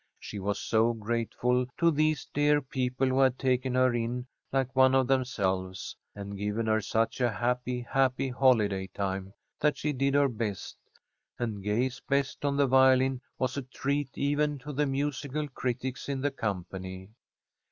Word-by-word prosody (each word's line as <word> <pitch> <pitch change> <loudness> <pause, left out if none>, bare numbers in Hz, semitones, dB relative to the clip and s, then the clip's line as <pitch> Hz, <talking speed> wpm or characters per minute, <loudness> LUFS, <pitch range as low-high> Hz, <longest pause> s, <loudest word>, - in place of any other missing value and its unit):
She 105 - -7
was 100 +1 -1
so 115 +1 +2
grateful 120 +3 0
to 170 -1 +4
these 155 -1 +1
dear 145 0 +4
people 130 -1 -1
who 130 +1 +1
had 130 -2 +4
taken 130 -1 0
her 130 -1 +4
in 120 +1 -2 0.3
like 130 -1 0
one 130 0 +6
of 130 -1 +4
themselves, 95 -8 -1 0.2
and 100 0 -6
given 105 +3 -2
her 110 0 +2
such 115 +4 0
a 120 - +3
happy, 125 +2 -1
happy 130 +2 +1
holiday 110 -7 +2
time 95 -1 -3 0.3
that 150 -1 +2
she 150 +1 -1
did 135 +1 +1
her 145 0 +5
best, 110 -5 -4 0.6
and 110 -4 -3
Gay's 120 +6 0
best 140 0 0
on 140 -1 +1
the 140 - +4
violin 130 0 +4 0.2
was 130 +1 -1
a - - 0
treat 140 +2 -2
even 145 +1 +1
to 145 +3 -8
the 145 +1 +1
musical 145 +1 -2
critics 130 +1 -3
in 135 -1 -2
the 145 +1 +1
company. 95 -4 -5
130 Hz, 165 wpm, -29 LUFS, 110-135 Hz, 0.6 s, one